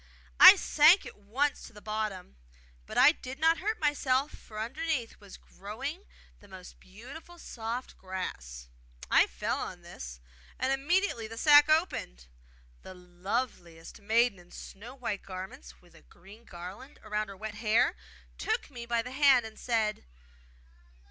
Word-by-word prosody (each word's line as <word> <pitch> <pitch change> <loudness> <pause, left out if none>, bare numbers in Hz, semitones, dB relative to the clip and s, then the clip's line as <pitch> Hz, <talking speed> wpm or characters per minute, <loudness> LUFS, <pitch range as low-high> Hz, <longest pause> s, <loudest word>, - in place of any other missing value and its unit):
I 370 +2 +12
sank 335 0 +5
at - - -10
once 250 +9 -1
to - - -16
the 210 - -12
bottom; 215 - -4 0.5
but - - -7
I - - +8
did 265 -4 -9
not 325 +2 +3
hurt 430 +3 -2
myself 290 -2 +1
for 215 - -13
underneath 260 +1 -3
was 200 -2 -13
growing 270 - -8 0.3
the 205 - -18
most 185 -2 -12
beautiful 265 - -12
soft 235 -4 -6
grass. 60 - -6 0.4
I - - +6
fell - - -3
on - - -7
this, - - -9 0.4
and 265 +1 0
immediately 280 - 0
the 225 +1 -10
sack 295 +3 +7
opened; 310 - 0 0.6
the 185 - -11
loveliest 180 -1 -5
maiden 225 0 +2
in 175 0 -18
snow 225 +9 -11
white 235 -6 -4
garments, 185 - -10
with - - -22
a - - -18
green 200 - -17
garland 185 +11 -10
round 210 0 -3
her 195 - -10
wet 215 +1 -6
hair, 230 - +3 0.4
took 440 -7 -2
me 240 -2 -8
by 235 -1 0
the 250 - -8
hand, 265 -3 +4
and 220 0 -11
said! 220 -3 -1
225 Hz, 150 wpm, -29 LUFS, 190-280 Hz, 0.6 s, I